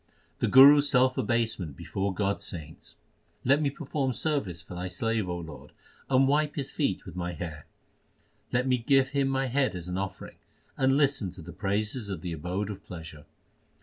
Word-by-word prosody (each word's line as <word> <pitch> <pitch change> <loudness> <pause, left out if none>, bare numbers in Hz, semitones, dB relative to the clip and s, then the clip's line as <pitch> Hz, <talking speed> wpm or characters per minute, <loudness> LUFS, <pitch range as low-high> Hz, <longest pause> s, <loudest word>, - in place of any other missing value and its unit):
1 - - -41 0.3
The - - +1
Guru 140 +3 +9
s 145 - +1
self 130 -2 +3
abasement 110 - -1
before 100 0 -2
God 100 +1 0
s - - -10
saints: 80 -3 -8 0.5
Let 140 +4 +4
me 145 - +2
perform 140 -2 -2
service 120 - -1
for - - -10
Thy 90 +1 -4
slave, 105 +2 -1
O 90 - -2
Lord: 80 -3 -10 0.4
and 135 0 +4
wipe 150 +1 +1
his 140 -3 -3
feet 120 - -1
with 90 -4 -9
my 90 -1 -3
hair. 75 -2 -7 0.8
Let 125 +1 +1
me 130 -1 +2
give 130 +2 +3
him 140 -1 +1
my 135 0 0
head 130 -3 +1
as 90 -1 -6
an 90 +1 -2
offering, 100 0 -6 0.4
and 135 +1 +3
listen 140 -9 +2
to 90 -3 -10
the 85 - -9
praises 105 +2 -2
of 95 -5 -4
the 85 -1 -4
Abode 90 +6 -3
of 100 -1 -9
pleasure. 80 -4 -10
105 Hz, 195 wpm, -28 LUFS, 90-135 Hz, 0.8 s, Guru